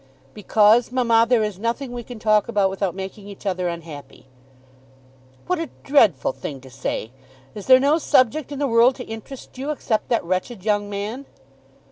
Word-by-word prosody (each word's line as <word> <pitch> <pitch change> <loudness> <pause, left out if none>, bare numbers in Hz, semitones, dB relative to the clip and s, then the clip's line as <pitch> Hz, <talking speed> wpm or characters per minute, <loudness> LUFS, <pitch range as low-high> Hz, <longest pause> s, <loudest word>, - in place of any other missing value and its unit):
"Because, 215 +3 +3
mamma, 230 -3 +3
there 240 -3 +3
is 210 -3 -4
nothing 235 +4 -3
we 245 0 -5
can 240 0 -10
talk 215 -1 +2
about 205 -4 +1
without 195 -2 -2
making 195 +1 -7
each 200 0 -12
other 185 -2 -1
unhappy." 165 -6 -8 1.2
"What 365 -1 -1
a 330 - -4
dreadful 205 - +3
thing 135 +1 -7
to 130 0 -14
say! 125 -3 -4 0.4
Is 205 - -9
there 260 0 +8
no 290 +4 +3
subject 285 0 +2
in 285 - -5
the 285 - 0
world 240 +1 +4
to 250 - -7
interest 235 +4 -10
you 275 +3 -4
except 240 -7 -2
that 235 - +1
wretched 185 +4 -3
young 205 -1 0
man?" 210 +7 -5
220 Hz, 175 wpm, -22 LUFS, 195-255 Hz, 1.2 s, there